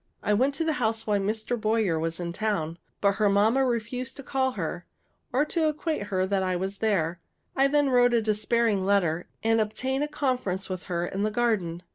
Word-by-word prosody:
I 210 Hz, -, +2 dB
went 265 Hz, +6 st, +2 dB
to 325 Hz, -, -1 dB
the 320 Hz, -1 st, +1 dB
house 220 Hz, -1 st, 0 dB
while 210 Hz, -2 st, +1 dB
Mr. 215 Hz, +3 st, -2 dB
Boyer 215 Hz, -6 st, +1 dB
was 165 Hz, +1 st, -2 dB
in 170 Hz, -1 st, -4 dB
town; 170 Hz, -6 st, -2 dB, 0.2 s
but 200 Hz, -1 st, +2 dB
her 210 Hz, -2 st, +3 dB
mamma 220 Hz, +7 st, +3 dB
refused 250 Hz, +1 st, -2 dB
to 275 Hz, -, -8 dB
call 260 Hz, -1 st, 0 dB
her, -, -, -4 dB, 0.4 s
or 270 Hz, +4 st, +2 dB
to 315 Hz, 0 st, +1 dB
acquaint 305 Hz, -7 st, -3 dB
her 185 Hz, -2 st, 0 dB
that 195 Hz, 0 st, 0 dB
I 185 Hz, -1 st, 0 dB
was 190 Hz, +2 st, -3 dB
there. 175 Hz, -6 st, 0 dB, 0.3 s
I 270 Hz, 0 st, +4 dB
then 290 Hz, -1 st, +2 dB
wrote 245 Hz, -1 st, +4 dB
a -, -, +4 dB
despairing 215 Hz, -1 st, +1 dB
letter, 175 Hz, -4 st, +1 dB, 0.2 s
and 225 Hz, 0 st, +3 dB
obtained 260 Hz, +6 st, -1 dB
a -, -, -1 dB
conference 250 Hz, -11 st, -2 dB
with 185 Hz, -1 st, -5 dB
her 170 Hz, -1 st, -1 dB
in 195 Hz, +2 st, -4 dB
the 215 Hz, -, +2 dB
garden. 210 Hz, -7 st, 0 dB
215 Hz, 205 wpm, -27 LUFS, 190-255 Hz, 0.4 s, I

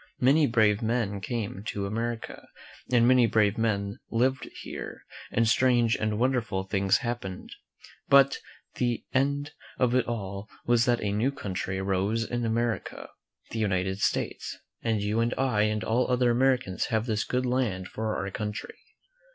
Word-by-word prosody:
Many 140 Hz, +4 st, +4 dB
brave 110 Hz, -2 st, +3 dB
men 110 Hz, -3 st, 0 dB
came 105 Hz, -3 st, -4 dB
to 100 Hz, -1 st, -2 dB
America, 115 Hz, +3 st, -4 dB, 0.4 s
and 120 Hz, -1 st, +5 dB
many 125 Hz, -2 st, +5 dB
brave 105 Hz, -2 st, +3 dB
men 100 Hz, -3 st, -1 dB
lived 130 Hz, +3 st, 0 dB
here, -, -, -7 dB, 0.3 s
and 115 Hz, 0 st, +2 dB
strange 120 Hz, -1 st, +3 dB
and 110 Hz, -1 st, -1 dB
wonderful 115 Hz, -6 st, 0 dB
things 95 Hz, 0 st, +2 dB
hap 120 Hz, +1 st, -2 dB
pened; 95 Hz, -1 st, -7 dB, 0.6 s
but 140 Hz, 0 st, +6 dB, 0.4 s
the 120 Hz, -2 st, -1 dB
end 140 Hz, +2 st, +1 dB, 0.3 s
of 125 Hz, -2 st, +2 dB
it 125 Hz, -2 st, +2 dB
all 100 Hz, -3 st, -4 dB, 0.2 s
was 120 Hz, 0 st, +3 dB
that 120 Hz, -3 st, +1 dB
a 100 Hz, -, 0 dB
new 110 Hz, +7 st, +1 dB
country 95 Hz, -6 st, -4 dB
arose 100 Hz, +4 st, 0 dB
in 120 Hz, +1 st, -2 dB
America 115 Hz, +1 st, -2 dB, 0.2 s
— -, -, -34 dB
the 115 Hz, -, -3 dB
United 95 Hz, -2 st, 0 dB
States, 95 Hz, -, -1 dB, 0.2 s
and 110 Hz, -3 st, 0 dB
you 105 Hz, +2 st, 0 dB
and 115 Hz, +1 st, +1 dB
I 125 Hz, -6 st, +2 dB
and 105 Hz, 0 st, -1 dB
all 120 Hz, +4 st, +1 dB
other 125 Hz, -1 st, +3 dB
Americans 125 Hz, -5 st, +1 dB
have 110 Hz, -2 st, 0 dB
this 110 Hz, -3 st, 0 dB
good 125 Hz, 0 st, -1 dB
land 120 Hz, -8 st, 0 dB
for 110 Hz, +2 st, -3 dB
our 95 Hz, 0 st, -3 dB
country. 105 Hz, +1 st, -5 dB
115 Hz, 160 wpm, -27 LUFS, 100-125 Hz, 0.6 s, but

